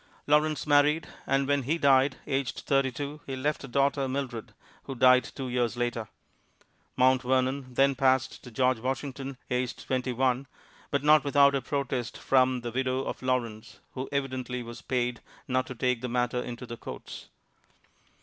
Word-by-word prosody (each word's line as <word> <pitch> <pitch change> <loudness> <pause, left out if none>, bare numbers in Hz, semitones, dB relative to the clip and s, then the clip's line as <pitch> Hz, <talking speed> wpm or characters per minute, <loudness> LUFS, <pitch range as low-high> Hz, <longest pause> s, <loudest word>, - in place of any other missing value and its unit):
Lawrence 150 +1 +2
married, 150 +2 +4 0.2
and 135 0 +1
when 145 0 +2
he 145 +6 0
died, 135 -2 +4
aged 135 -1 -2
thirty 135 -1 +1
two, 145 +3 -6
he 135 - -3
left 145 +3 -2
a - - -6
daughter, 140 +1 +1
Mildred, 130 -4 -4 0.3
who 135 - -5
died 125 +1 +6
two 135 -2 -6
years 120 -1 -1
later. 120 -2 -2 0.9
Mount 130 0 +4
Vernon 130 0 0
then 135 +1 +4
passed 130 -1 +1
to 125 - -10
George 130 0 +1
Washington, 135 +1 -4
aged 125 -2 -2
twenty 130 0 -1
one, 130 +2 0 0.4
but 140 -1 0
not 150 -1 +6
without 140 0 +5
a 135 - 0
protest 130 -2 -3
from 130 -1 +2
the 120 0 -5
widow 130 +1 -1
of - - -5
Lawrence, 120 -4 -2
who 130 0 -5
evidently 130 -3 -3
was 115 0 -9
paid 125 -1 -1 0.3
not 130 0 0
to 130 - -7
take 125 -1 0
the 125 - -3
matter 125 0 0
into 120 0 -7
the 120 -1 -7
courts. - - -9
130 Hz, 170 wpm, -28 LUFS, 125-140 Hz, 0.9 s, died